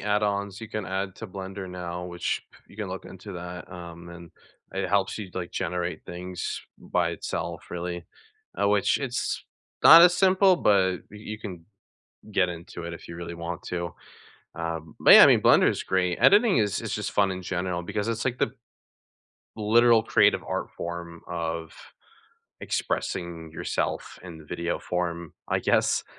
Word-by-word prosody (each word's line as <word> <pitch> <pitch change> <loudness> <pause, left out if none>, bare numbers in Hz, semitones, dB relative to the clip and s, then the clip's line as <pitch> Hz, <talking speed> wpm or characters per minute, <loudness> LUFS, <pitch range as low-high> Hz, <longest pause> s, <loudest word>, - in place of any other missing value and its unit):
add-ons 100 -1 0
you 110 - -7
can 110 -3 -4
add 95 0 -3
to 110 - -8
Blender 95 0 -7
now, 90 -1 -5
which 85 -1 -3 0.2
you - - -17
can 105 -3 -4
look 95 +1 -6
into 95 +2 -10
that, 90 0 -8
um, 85 -1 -9
and, 85 -1 -11 0.4
it 95 -1 -2
helps 100 0 +1
you, 100 -4 -6
like, 90 -2 -4
generate 90 -1 -3
things 90 +1 -5 0.2
by - - 0
itself, - - -5
really, 90 0 -4 0.6
uh, 100 - +3
which 100 0 +3
it's, 130 -3 -2 0.4
not 165 +1 +11
as 175 0 +7
simple, 190 0 +5
but 95 - +3
y 105 - -11 0.2
you 110 - -6
can 90 -6 -8 0.7
get 95 -3 +3
into 85 0 -8
it 85 - -5
if 85 - -10
you 85 - -8
really 85 0 -6
want 85 0 -5
to. 85 -1 -4 0.6
Um, 80 -2 -5
but, - - +8
yeah, - - +12
I - - +9
mean, - - +5
Blender - - +6
is - - -2
great. 90 -2 0
Editing 210 - +6
is 105 -4 0
is - - -4
just - - -3
fun 100 -1 +2
in 95 0 -5
general 90 -1 -2
because 100 +4 -3
it's 115 -1 -1
like 125 -2 0
the - - 0 1.0
literal 115 +2 +5
creative - - +3
art - - -3
form 85 -1 -6
of 85 -1 -4 0.9
expressing 85 -2 -3
yourself 80 - -3
in 85 -3 -9
the 80 - -13
video 85 +2 -3
form, 85 -2 -3 0.2
I - - +1
guess? - - +2
90 Hz, 170 wpm, -26 LUFS, 85-105 Hz, 1.0 s, yeah